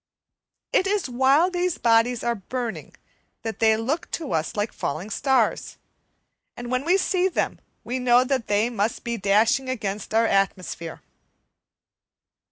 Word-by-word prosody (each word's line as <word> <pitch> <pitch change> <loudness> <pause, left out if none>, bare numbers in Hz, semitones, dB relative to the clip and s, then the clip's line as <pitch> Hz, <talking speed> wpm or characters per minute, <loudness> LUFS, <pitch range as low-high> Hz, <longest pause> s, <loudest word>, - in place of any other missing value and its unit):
It 375 - +3
is 400 -4 0
while 270 +8 +3
these 360 -1 -1
bodies 230 +1 +2
are 235 - +1
burning 235 +2 -5 0.5
that 225 -1 -5
they 220 -1 +4
look 270 +10 -2
to 315 -5 -3
us 160 -1 -1
like 210 +1 -2
falling 175 +9 -4
stars, 265 +5 0 0.8
and 240 0 -6
when 255 +1 0
we 360 +3 +4
see 370 -1 +1
them 375 - -2 0.2
we 255 +2 -3
know 250 0 +4
that 260 -3 -1
hey 210 +4 +1
must 220 0 -2
be 235 0 -2
dashing 220 +6 +2
against 210 -5 -4
our 225 +1 +4
atmosphere. 185 -5 -1
240 Hz, 145 wpm, -24 LUFS, 215-265 Hz, 0.8 s, they